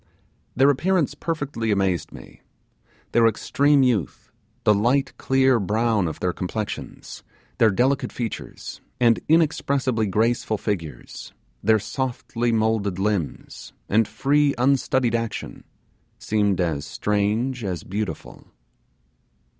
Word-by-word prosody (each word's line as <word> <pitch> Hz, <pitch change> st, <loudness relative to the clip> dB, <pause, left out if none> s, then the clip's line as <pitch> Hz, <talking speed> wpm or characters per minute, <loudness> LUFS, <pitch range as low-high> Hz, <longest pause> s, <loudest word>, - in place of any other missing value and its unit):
Their 135 Hz, +3 st, +5 dB
appearance 165 Hz, +1 st, +1 dB
perfectly 145 Hz, -7 st, -3 dB
amazed 95 Hz, -5 st, 0 dB
me; -, -, -13 dB, 0.7 s
their 115 Hz, 0 st, +5 dB
extreme 140 Hz, +5 st, +2 dB
youth, 110 Hz, -, -1 dB, 0.3 s
the 105 Hz, -, +5 dB
light 125 Hz, +6 st, +1 dB
clear 130 Hz, -2 st, +3 dB
brown 105 Hz, -1 st, +1 dB
of 80 Hz, -, -5 dB
their 90 Hz, -1 st, -1 dB
complexions, 105 Hz, +4 st, -5 dB, 0.4 s
their 115 Hz, -, +6 dB
delicate 130 Hz, +7 st, +1 dB
features, 115 Hz, -3 st, -6 dB, 0.2 s
and 115 Hz, -2 st, +4 dB
inexpressibly 140 Hz, -7 st, +2 dB
graceful 110 Hz, +2 st, 0 dB
figures, 80 Hz, -, -5 dB, 0.3 s
their 110 Hz, +1 st, +4 dB
softly 120 Hz, +1 st, -2 dB
moulded 110 Hz, -4 st, 0 dB
limbs, 95 Hz, -5 st, -3 dB
and 110 Hz, +1 st, +2 dB
free 145 Hz, +1 st, +2 dB
unstudied 130 Hz, -1 st, +2 dB
action, 115 Hz, -1 st, -4 dB, 0.5 s
seemed 105 Hz, -3 st, 0 dB
as 80 Hz, -5 st, 0 dB
strange 105 Hz, -, -1 dB
as 90 Hz, -5 st, -3 dB
beautiful. 105 Hz, +2 st, -5 dB
115 Hz, 105 wpm, -23 LUFS, 100-130 Hz, 0.7 s, their